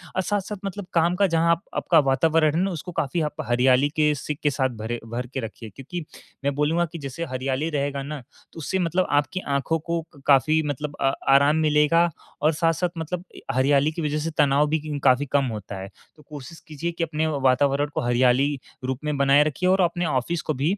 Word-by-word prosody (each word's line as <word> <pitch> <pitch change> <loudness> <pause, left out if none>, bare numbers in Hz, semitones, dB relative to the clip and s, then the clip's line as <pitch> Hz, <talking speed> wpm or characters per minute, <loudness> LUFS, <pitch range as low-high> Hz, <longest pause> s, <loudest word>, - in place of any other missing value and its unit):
और 185 - +2
साथ-साथ 205 +1 -2
मतलब 195 0 -5
काम 170 +1 +3
का 200 +1 +3
जहाँ 170 0 +3 0.2
आपका 165 -3 +3
वातावरण 155 +3 +2
है 170 - +2
ना, 195 0 0
उसको 175 +2 -6
काफ़ी 165 0 -1
आप 150 -1 -2
हरियाली 125 +3 +3
के 150 -1 +3
सिक 150 +1 -5
के 145 - +4
साथ 130 -1 0
भरे 115 +2 -4
भर 120 +2 -5
के - - -2
रखिए। 115 -1 -7
क्योंकि 165 +6 -6 0.4
मैं 140 0 +1
बोलूँगा 160 +4 +1
कि 170 - -6
जैसे 140 +4 -5
हरियाली 130 +2 -2
रहेगा 140 -2 -2
ना, 145 -1 -6 0.3
तो - - -15
उससे 190 +5 -2
मतलब 180 +1 +1
आपकी 145 +6 +1 0.2
आँखों 150 +4 0
को 170 +2 -2 0.3
काफ़ी 155 +3 +4
मतलब 145 +1 -4
अ 135 - +3 0.3
आराम 145 +2 +3
मिलेगा 160 +2 +3 0.3
और 155 +2 +3
साथ-साथ 165 +3 +1
मतलब 170 +2 -4 0.3
हरियाली 140 +3 +3
की 165 - -5
वजह 150 -1 -1
से 165 +2 -3
तनाव 145 0 +4
भी 150 -2 -2
काफ़ी 130 +3 +4
कम 140 0 +1
होता 100 -1 -7
है। 95 - -7 0.3
तो 150 - -19
कोशिश 150 +2 -9
कीजिए 160 +2 -4
कि 170 0 -3
अपने 160 0 -1
वातावरण 140 0 +2
को - - 0
हरियाली 130 +3 +2 0.3
रूप 130 0 -2
में 150 -1 -1
बनाए 140 +1 +5
रखिए 155 +5 -1
और 190 +1 +4
अपने 175 0 +1
ऑफिस 155 +4 -1
को 155 - -2
भी, 150 +9 0
150 Hz, 205 wpm, -24 LUFS, 135-165 Hz, 0.4 s, बनाए